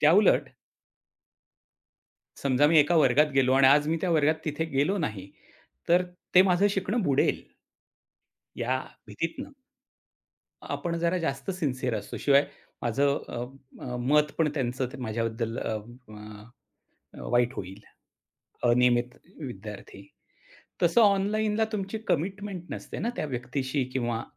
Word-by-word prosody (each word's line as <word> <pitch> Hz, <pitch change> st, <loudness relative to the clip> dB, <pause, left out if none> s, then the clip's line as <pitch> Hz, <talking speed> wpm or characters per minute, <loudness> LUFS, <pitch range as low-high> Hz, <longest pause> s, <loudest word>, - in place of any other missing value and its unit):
त्याउलट 175 Hz, +7 st, +5 dB, 2.0 s
समजा 140 Hz, +1 st, +3 dB
मी 160 Hz, -, +5 dB
एका 170 Hz, +4 st, +3 dB
वर्गात 150 Hz, 0 st, +5 dB
गेलो 130 Hz, -1 st, +4 dB
आणि 135 Hz, -, +7 dB
आज 145 Hz, +2 st, +5 dB
मी 165 Hz, -, +1 dB
त्या 185 Hz, -, 0 dB
वर्गात 155 Hz, 0 st, +3 dB
तिथे 155 Hz, +2 st, -2 dB
गेलो 145 Hz, +9 st, +2 dB
नाही, 105 Hz, -, -4 dB, 0.6 s
तर 180 Hz, +1 st, +5 dB, 0.3 s
ते 180 Hz, -, +10 dB
माझं 185 Hz, +3 st, +4 dB
शिकणं 200 Hz, +4 st, -1 dB
बुडेल. 140 Hz, -5 st, +1 dB, 1.2 s
या 130 Hz, +2 st, 0 dB, 0.3 s
भीतीतनं 165 Hz, -, -5 dB, 1.1 s
आपण 170 Hz, -1 st, -3 dB
जरा 170 Hz, +2 st, +1 dB
जास्त 140 Hz, -1 st, -3 dB
सिन्सिअर 130 Hz, -8 st, -2 dB
असतो. 105 Hz, -, -6 dB
शिवाय 140 Hz, 0 st, +4 dB, 0.4 s
माझं 140 Hz, +4 st, +1 dB
अ, 120 Hz, -, -5 dB, 0.4 s
अ, 125 Hz, -1 st, -4 dB
मत 150 Hz, +4 st, +2 dB
पण 160 Hz, -2 st, +2 dB
त्यांचं 130 Hz, -2 st, -1 dB
त -, -, -6 dB
माझ्याबद्दल 115 Hz, 0 st, -3 dB
अं, 110 Hz, -1 st, -3 dB, 0.4 s
अ, 105 Hz, 0 st, -11 dB, 0.7 s
अ, -, -, -8 dB
वाईट 120 Hz, +1 st, +2 dB
होईल, 95 Hz, +2 st, -7 dB, 0.9 s
अनियमित 125 Hz, 0 st, +3 dB, 0.2 s
विद्यार्थी. -, -, -9 dB, 0.8 s
तसं 235 Hz, -, +4 dB
ऑनलाईनला 210 Hz, +2 st, +2 dB
तुमची 195 Hz, +1 st, -3 dB
कमिटमेंट 190 Hz, +2 st, -2 dB
नसते -, -, -6 dB
ना 230 Hz, -, -1 dB
त्या -, -, -2 dB
व्यक्तीशी 130 Hz, +2 st, -2 dB
किंवा 120 Hz, -3 st, -1 dB
145 Hz, 125 wpm, -27 LUFS, 125-175 Hz, 2.0 s, ते